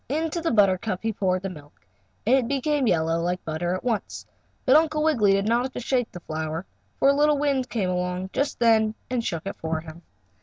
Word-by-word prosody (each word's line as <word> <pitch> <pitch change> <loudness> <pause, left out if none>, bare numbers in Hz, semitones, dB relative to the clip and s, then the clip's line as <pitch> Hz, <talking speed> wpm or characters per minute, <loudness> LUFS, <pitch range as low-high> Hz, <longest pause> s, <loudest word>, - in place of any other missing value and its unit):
Into 320 +4 -1
the 330 - 0
buttercup 200 - +2
he 225 0 0
poured 185 -2 0
the 195 - -2
milk, 145 -4 -14 0.5
and 245 +5 +5
it 255 -3 +1
became 280 0 0
yellow 165 -2 +1
like 180 +1 -2
butter 175 +3 -2
at 185 - -6
once. 230 -5 -3 0.4
But 260 - +5
Uncle 310 -1 +3
Wiggily 230 -11 +3
did 195 0 +1
not 235 +2 +2
have 260 - -5
to - - -4
shake 245 -1 -1
the 175 - -9
flower, 160 +2 -4 0.3
for 275 - +4
a - - +5
little 295 +1 +3
wind 275 -3 0
came 195 -6 -1
along 180 +1 -2
just 280 +1 -1
then 220 -2 +3 0.2
and 245 -2 0
shook 165 -5 -3
it 195 - -5
for 160 0 -2
him. 160 +1 -11
215 Hz, 220 wpm, -25 LUFS, 180-265 Hz, 0.5 s, and